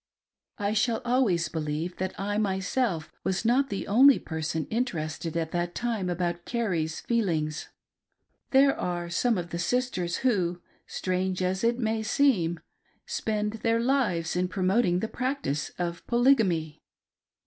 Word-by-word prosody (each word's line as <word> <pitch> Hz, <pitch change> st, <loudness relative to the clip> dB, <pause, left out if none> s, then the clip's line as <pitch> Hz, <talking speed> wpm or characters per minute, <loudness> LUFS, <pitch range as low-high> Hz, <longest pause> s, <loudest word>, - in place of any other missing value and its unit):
I 205 Hz, +1 st, -1 dB
shall 225 Hz, +1 st, +1 dB
always 230 Hz, -10 st, +2 dB
believe 155 Hz, +2 st, -3 dB
that 190 Hz, 0 st, -4 dB
I 205 Hz, +1 st, -1 dB
myself 190 Hz, -3 st, -1 dB
was 190 Hz, +3 st, -1 dB
not 265 Hz, +4 st, +3 dB
the 200 Hz, -, -3 dB
only 260 Hz, +7 st, +6 dB
person 160 Hz, -1 st, -3 dB
interested 170 Hz, -8 st, -2 dB
at 165 Hz, -1 st, -2 dB
that 175 Hz, 0 st, -2 dB
time 225 Hz, -6 st, -1 dB
about 175 Hz, 0 st, -2 dB
Carrie's 175 Hz, -10 st, -2 dB
feelings. 165 Hz, -10 st, -1 dB, 0.8 s
There 275 Hz, +1 st, +5 dB
are 175 Hz, -1 st, -3 dB
some 230 Hz, +5 st, +2 dB
of 175 Hz, -1 st, -4 dB
the 170 Hz, -, -3 dB
sisters 180 Hz, -4 st, 0 dB
who 180 Hz, -8 st, +1 dB
— -, -, -37 dB
strange 185 Hz, 0 st, -1 dB
as 185 Hz, +2 st, -1 dB
it 235 Hz, +1 st, +2 dB
may 220 Hz, -2 st, 0 dB
seem 215 Hz, -, +2 dB, 0.3 s
— -, -, -39 dB
spend 215 Hz, -, -2 dB
their 230 Hz, 0 st, +2 dB
lives 230 Hz, -11 st, +1 dB
in 180 Hz, +1 st, +1 dB
promoting 185 Hz, 0 st, +1 dB
the 220 Hz, -, -1 dB
practice 255 Hz, -, -2 dB
of 170 Hz, -1 st, -4 dB
Polygamy. 225 Hz, -, +2 dB
190 Hz, 145 wpm, -27 LUFS, 170-235 Hz, 0.8 s, only